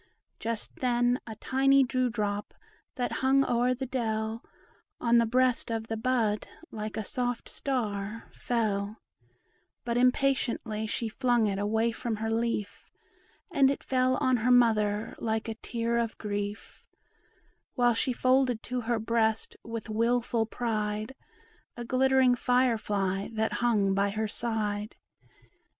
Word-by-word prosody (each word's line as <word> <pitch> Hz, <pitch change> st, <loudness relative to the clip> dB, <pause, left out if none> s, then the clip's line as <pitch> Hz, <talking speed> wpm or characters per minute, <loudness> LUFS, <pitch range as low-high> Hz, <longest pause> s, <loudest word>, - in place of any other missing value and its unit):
Just 230 Hz, -1 st, -4 dB
then 245 Hz, 0 st, +2 dB
a 220 Hz, -, -6 dB
tiny 270 Hz, +4 st, +3 dB
dew 255 Hz, -1 st, 0 dB
drop 210 Hz, -2 st, -3 dB, 0.4 s
that 245 Hz, -2 st, -2 dB
hung 270 Hz, +1 st, +4 dB
o'er 245 Hz, +1 st, +2 dB
the 265 Hz, +2 st, -4 dB
dell 225 Hz, -3 st, -2 dB, 0.6 s
On 235 Hz, 0 st, +4 dB
the 230 Hz, -, +2 dB
breast 250 Hz, +1 st, +2 dB
of 225 Hz, 0 st, -3 dB
the 225 Hz, -, -1 dB
bud 225 Hz, -2 st, 0 dB, 0.2 s
like 215 Hz, 0 st, -5 dB
a 220 Hz, -, -2 dB
soft 245 Hz, +3 st, -2 dB
star 215 Hz, -5 st, -3 dB
fell; 215 Hz, -3 st, -1 dB, 0.9 s
But 235 Hz, 0 st, 0 dB
impatiently 250 Hz, -4 st, +1 dB
she 230 Hz, +2 st, -2 dB
flung 240 Hz, 0 st, +1 dB
it 200 Hz, -2 st, -1 dB
away 220 Hz, +3 st, +1 dB
from 230 Hz, 0 st, -3 dB
her 220 Hz, +1 st, -3 dB
leaf, 225 Hz, -2 st, -2 dB, 0.6 s
And 280 Hz, -5 st, +4 dB
it 275 Hz, -, -2 dB
fell 255 Hz, 0 st, +2 dB
on 255 Hz, -1 st, +2 dB
her 235 Hz, +2 st, 0 dB
mother 220 Hz, -4 st, +3 dB
like 220 Hz, 0 st, -1 dB
a 225 Hz, -, -2 dB
tear 235 Hz, +1 st, -2 dB
of 230 Hz, -1 st, -2 dB
grief, 205 Hz, 0 st, -5 dB, 0.9 s
While 245 Hz, -2 st, +4 dB
she 230 Hz, +3 st, 0 dB
folded 255 Hz, -1 st, +2 dB
to 250 Hz, 0 st, -3 dB
her 235 Hz, 0 st, 0 dB
breast, 220 Hz, 0 st, 0 dB
with 230 Hz, 0 st, -6 dB
wilful 230 Hz, +1 st, +1 dB
pride, 215 Hz, 0 st, -2 dB, 0.6 s
A 240 Hz, -, -5 dB
glittering 260 Hz, 0 st, +4 dB
fire 245 Hz, -1 st, +2 dB
fly 195 Hz, -2 st, -1 dB
that 220 Hz, 0 st, 0 dB
hung 210 Hz, -5 st, +2 dB
by 200 Hz, +1 st, +2 dB
her 215 Hz, +2 st, -2 dB
side. 210 Hz, -2 st, -2 dB
230 Hz, 140 wpm, -29 LUFS, 215-250 Hz, 0.9 s, hung